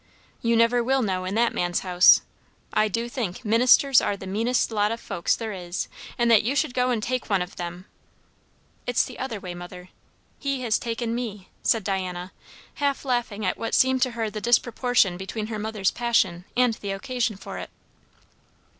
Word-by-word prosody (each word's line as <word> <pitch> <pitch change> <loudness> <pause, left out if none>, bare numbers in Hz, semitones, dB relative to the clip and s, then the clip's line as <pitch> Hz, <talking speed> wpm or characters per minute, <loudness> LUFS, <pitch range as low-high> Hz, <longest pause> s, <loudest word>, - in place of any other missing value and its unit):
"You 230 0 +2
never 230 +1 +3
will 265 +1 +2
know, 185 -3 -1
in 190 +2 -3
that 235 +1 +2
man's 175 0 0
house. 180 -1 +6 0.5
I 215 - +3
do 230 +3 -2
think, 235 -4 -4
ministers 250 +5 +5
are 200 - -1
the 190 - -9
meanest 225 +6 0
lot 210 -1 +1
o' 230 - -2
folks 175 -6 -1
there 220 -2 -5
is; 175 -1 -4 0.3
and 235 -1 +3
that 220 -2 +7
you 245 +6 -1
should 260 - 0
go 250 0 +1
and 230 -4 0
take 255 0 -2
one 195 -3 +2
of 180 - -12
them!" 175 +1 -6 1.0
"It 245 - -2
is - - +4
the - - -10
other 245 -5 -4
way, 180 -2 -6
mother; 180 +1 -10 0.5
he 275 -2 -2
has 230 -3 +1
taken 230 0 -3
me," 215 -6 -5
said 225 -3 +2
Diana, 185 -2 -3 0.5
half 280 -1 0
laughing 235 -5 -1
at 185 - -1
what 225 - -1
seemed 260 0 +3
to 255 - +2
her 220 -2 -1
the 215 - -5
disproportion 240 -4 +2
between 195 +3 -4
her 215 - -3
mother's 210 -2 0
passion 200 -7 +1
and 250 -2 +4
the 205 -2 -7
occasion 240 +2 -2
for 190 - -8
it. - - -7
220 Hz, 190 wpm, -25 LUFS, 190-245 Hz, 1.0 s, that